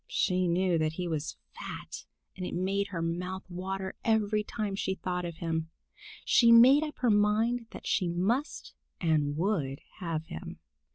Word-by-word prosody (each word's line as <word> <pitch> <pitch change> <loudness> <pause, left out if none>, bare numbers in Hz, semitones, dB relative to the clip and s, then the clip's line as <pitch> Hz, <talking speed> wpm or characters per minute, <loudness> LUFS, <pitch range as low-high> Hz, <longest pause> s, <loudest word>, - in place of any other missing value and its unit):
She 185 -1 +1
knew 175 0 +2
that 155 0 0
he 180 +2 -3
was 155 -2 -3 0.2
fat, - - -8 0.3
and 185 - -6
it - - -4
made 195 +3 0
her 175 -5 -4
mouth 180 +3 -3
water 190 +1 -4
every 215 -1 +2
time 210 -2 -3
she 190 -1 -1
thought 180 -1 -3
of 170 -1 -5
him. 160 -1 -2 0.6
She 235 -1 +6
made 250 +5 +8
up 305 -1 -4
her 245 -3 +2
mind 220 +3 +2
that - - -10
she 185 - +1
must 200 - -1 0.3
and 150 -4 +1
would 160 -7 0 0.2
have 165 -3 -3
him. 80 - -8
185 Hz, 165 wpm, -30 LUFS, 170-210 Hz, 0.6 s, made